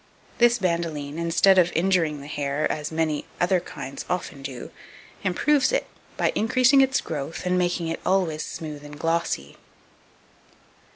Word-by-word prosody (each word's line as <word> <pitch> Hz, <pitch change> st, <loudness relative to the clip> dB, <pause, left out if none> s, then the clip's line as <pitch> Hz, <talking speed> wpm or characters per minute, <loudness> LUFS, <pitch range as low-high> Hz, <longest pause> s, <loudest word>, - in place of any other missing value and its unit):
This 240 Hz, 0 st, +5 dB
bandoline, 165 Hz, -6 st, -2 dB
instead 175 Hz, +3 st, +4 dB
of 175 Hz, -1 st, +3 dB
injuring 165 Hz, -4 st, +1 dB
the 140 Hz, -, -9 dB
hair, 145 Hz, 0 st, -1 dB
as 150 Hz, 0 st, -4 dB
many 160 Hz, -2 st, -1 dB
other 180 Hz, +1 st, +3 dB
kinds 135 Hz, -4 st, -7 dB
often 175 Hz, -6 st, -3 dB
do, 135 Hz, -2 st, -7 dB, 0.5 s
improves 275 Hz, +10 st, +2 dB
it, -, -, +1 dB, 0.3 s
by -, -, +2 dB
increasing 255 Hz, +4 st, +4 dB
its 265 Hz, 0 st, +2 dB
growth, 155 Hz, +2 st, -5 dB
and 180 Hz, 0 st, +1 dB
making 175 Hz, -2 st, 0 dB
it 165 Hz, -, -3 dB
always 180 Hz, -5 st, +1 dB
smooth 150 Hz, -3 st, -7 dB
and 145 Hz, 0 st, -10 dB
glossy. 165 Hz, -, -1 dB
165 Hz, 140 wpm, -25 LUFS, 150-185 Hz, 0.5 s, This